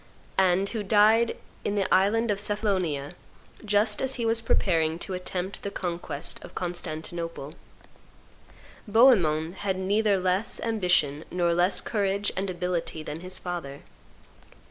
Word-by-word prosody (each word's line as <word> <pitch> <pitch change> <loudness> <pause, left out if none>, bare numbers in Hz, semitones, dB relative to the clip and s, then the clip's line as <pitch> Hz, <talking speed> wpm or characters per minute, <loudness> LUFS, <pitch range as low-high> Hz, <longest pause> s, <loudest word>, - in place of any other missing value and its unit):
and 190 +1 +3
who 225 - -3
died 215 +3 +4 0.3
in 205 - -1
the 200 -2 +1
island 210 +4 +3
of 200 - -1
Cephalonia 190 -9 -1 0.5
just 210 0 +1
as 265 0 0
he 235 - -2
was 225 0 +3
preparing 165 -7 +1
to 185 +2 -5
attempt 185 +1 -4
the 200 - -4
conquest 175 -6 -4
of - - -12
Constantinople. 165 -3 -4 1.3
Bohemond 190 -8 +4
had 195 -2 -1
neither 200 +2 +2
less 185 +3 0
ambition 180 -9 +1
nor 175 -1 +1
less 180 +2 +2
courage 200 -1 0
and 195 +1 -2
ability 175 -3 -3
than 155 +1 -6
his 185 +1 -4
father. 170 -7 -6
185 Hz, 130 wpm, -26 LUFS, 170-205 Hz, 1.3 s, died